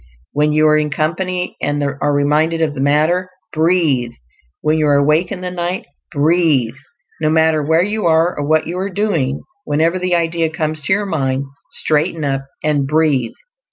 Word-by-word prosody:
When 150 +1 +1
you 155 +1 +3
are 155 - +4
in 150 0 0
company, 180 +5 -2
and 145 0 -1
are 140 +1 -1
reminded 150 +3 +1
of 160 -2 0
the 140 - -7
matter, 155 +6 +2 0.2
BREATHE. 155 -7 +1 0.5
When 155 +1 +1
you 155 - +2
are 145 - +4
awake 150 +5 +2
in 190 -2 -5
the 180 0 -4
night, 175 +1 -3 0.3
BREATHE. 150 -6 +2 0.5
No 155 - +2
matter 160 0 +3
where 160 +3 +2
you 210 -1 -1
are 165 +2 +3
or 145 - -3
what 155 +2 +2
you 175 +3 -4
are 195 +2 -2
doing, 170 -10 -1 0.2
whenever 165 - +1
the 180 -1 +1
idea 165 -1 0
comes 155 0 -3
to 190 - +2
your 205 +1 0
mind, 135 -6 -1 0.2
straighten 155 0 0
up 135 -1 -2 0.2
and 145 -3 +1
BREATHE. 145 -5 +1
155 Hz, 180 wpm, -17 LUFS, 145-170 Hz, 0.5 s, are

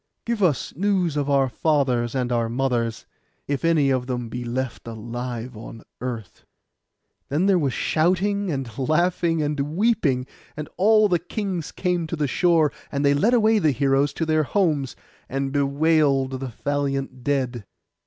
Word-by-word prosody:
Give 230 -2 -2
us 155 -9 +1
news 185 -3 +1
of 145 -1 -1
our 135 -1 +3
fathers 125 -2 0
and 125 -2 -1
our 115 -1 +1
mothers, 120 -2 -1 0.4
if 140 +1 -2
any 155 -5 +3
of 125 -1 0
them 125 -2 -3
be 125 +1 -5
left 125 0 -4
alive 120 +2 -5
on 115 +1 -10 0.2
earth.' 115 -8 -6 0.9
Then 155 +7 +1
there 195 -2 +4
was 140 -5 0
shouting, 190 +4 +1
and 135 -5 -5
laughing, 165 +3 +1
and 150 0 -2 0.2
weeping; 175 - +2 0.3
and 150 -1 -5
all 215 +2 +5
the 175 -3 +2
kings 180 -2 -4
came 180 -3 -1
to 165 - -3
the 150 -2 0
shore, 165 0 +3 0.2
and 140 0 -1
they 140 - +5
led 215 +13 +3
away 220 -1 +4
the 160 - +3
heroes 135 +1 +2
to 165 - -2
their 155 0 +2
homes, 150 -5 0 0.3
and 135 0 -2
bewailed 140 -2 +2
the 130 -2 -5
valiant 135 -2 -2
dead. 130 -6 -1
140 Hz, 160 wpm, -23 LUFS, 130-170 Hz, 0.9 s, all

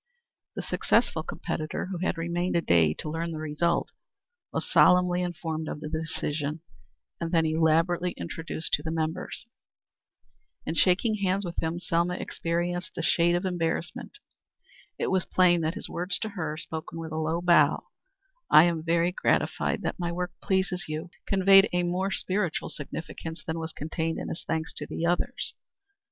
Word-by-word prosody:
The - - -4
successful - - +1
competitor, 155 0 -4
who 180 - -3
had 185 -1 -1
remained 170 +2 -1
a 170 - +3
day 85 - +4
to - - -5
learn 165 +2 -2
the 160 - -4
result, 155 +2 0 0.6
was - - -2
solemnly 180 0 +5
informed 160 -3 -3
of - - -4
the 150 - -6
decision, 155 -1 -2 0.6
and 165 -1 -3
then 165 -2 +3
elaborately 165 +3 +2
introduced 160 - -5
to - - +3
the 160 - -4
members. 160 +5 -3 1.2
In - - -2
shaking 195 +6 +3
hands 195 0 0
with 170 - -3
him, 165 +1 -1
Selma 175 0 0
experienced 175 +1 -2
a 165 - -2
shade 170 +1 +3
of 175 +2 -1
embarrassment. 175 -2 -2 0.8
It - - -1
was 190 -2 +2
plain 175 -2 +4
that 160 +1 -1
his - - -4
words 180 +2 -1
to 220 - -2
her, 160 -7 -4
spoken 160 0 -5
with 165 -1 -6
a 155 - -3
low 160 +2 0
bow 170 -4 +4 0.7
"I 155 - +9
am 170 -2 +1
very 170 +1 +2
much 180 - -10
gratified - - +1
that - - -2
my 170 -1 -1
work 180 0 -3
pleases 190 -2 0
you" 155 +3 -4 0.2
conveyed 195 0 +6
a 180 0 +2
more 180 +3 0
spiritual 190 -3 -1
significance 160 +2 -6
than 160 0 -3
was 160 0 -4
contained 160 +2 -3
in - - -4
his - - -5
thanks 160 0 -2
to - - -4
the 165 - -3
others. 175 +1 0
170 Hz, 170 wpm, -27 LUFS, 160-180 Hz, 1.2 s, I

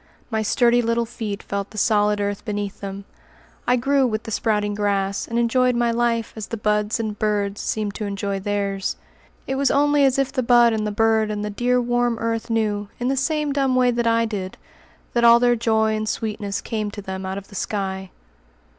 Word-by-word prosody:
My 220 -1 0
sturdy 240 +3 +3
little 230 0 0
feet 220 -3 -5
felt 200 0 -4
the 215 - -12
solid 210 -1 +2
earth 205 0 -2
beneath 205 -1 -4
them. 195 0 -6 0.6
I 245 - +4
grew 270 +2 +2
with 215 -1 -2
the 225 - -7
sprouting 210 -2 0
grass, 200 -1 -1
and 230 - -2
enjoyed 250 +1 +2
my 235 0 +2
life 230 -1 0
as 220 -2 -6
the 230 - -4
buds 210 +1 0
and 215 -2 -3
birds 205 -1 0
seemed 210 -2 -2
to 215 - -4
enjoy 200 0 -3
theirs. 200 -1 -2 0.5
It 265 - -2
was 275 -1 +2
only 290 0 +3
as 270 -1 +3
if 270 -1 +1
the 260 - 0
bud 240 -1 +5
and 215 -1 -1
the - - -2
bird 220 0 +2
and 210 0 -3
the 210 - -3
dear 245 +4 +1
warm 240 -1 +1
earth 230 0 -2
knew, 210 -3 0
in 245 +1 0
the 270 - +1
same 300 +1 0
dumb 270 -2 +1
way 250 -1 +4
that 235 -1 0
I 230 0 +3
did, 195 -4 -5 0.6
that 235 - +1
all 235 0 +8
their 245 0 +4
joy 220 -1 +1
and 215 0 -2
sweetness 210 -3 -3
came 215 -2 -3
to 205 0 -8
them 190 0 -5
out 190 +1 -4
of 200 0 -9
the - - -15
sky. 190 -2 -3
220 Hz, 210 wpm, -22 LUFS, 205-240 Hz, 0.6 s, all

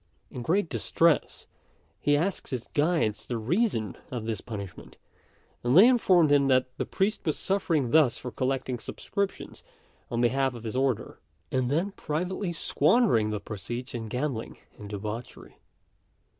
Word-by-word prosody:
In 125 - -6
great 175 +9 +1
distress, 165 -2 +1 0.5
he 145 0 +3
asked 180 +5 -2
his 125 -4 -4
guides 150 -9 +1
the 120 - -2
reason 115 - 0
of 120 -3 -4
this 110 -4 -3
punishment; 100 -5 -8 0.7
and 125 +5 +3
they 205 +6 +10
informed 185 - +4
him 140 -1 +4
that 130 -1 +2
the - - -2
priest 205 +3 0
was 155 -4 0
suffering 165 -10 0
thus 140 -6 +4
for 125 - -6
collecting 130 -1 -2
subscriptions 200 - -4 0.5
on 120 - -2
behalf 130 +2 +2
of 115 - -9
his 115 +1 -4
order, 130 -3 -1 0.3
and 130 -1 0
then 170 +8 0
privately 180 +3 -3
squandering 160 - +3
the 105 -1 -2
proceeds 110 +6 -6
in 115 -2 -4
gambling 125 0 -3 0.2
and 105 -1 -10
debauchery. 105 +3 -7
130 Hz, 145 wpm, -28 LUFS, 115-170 Hz, 0.7 s, they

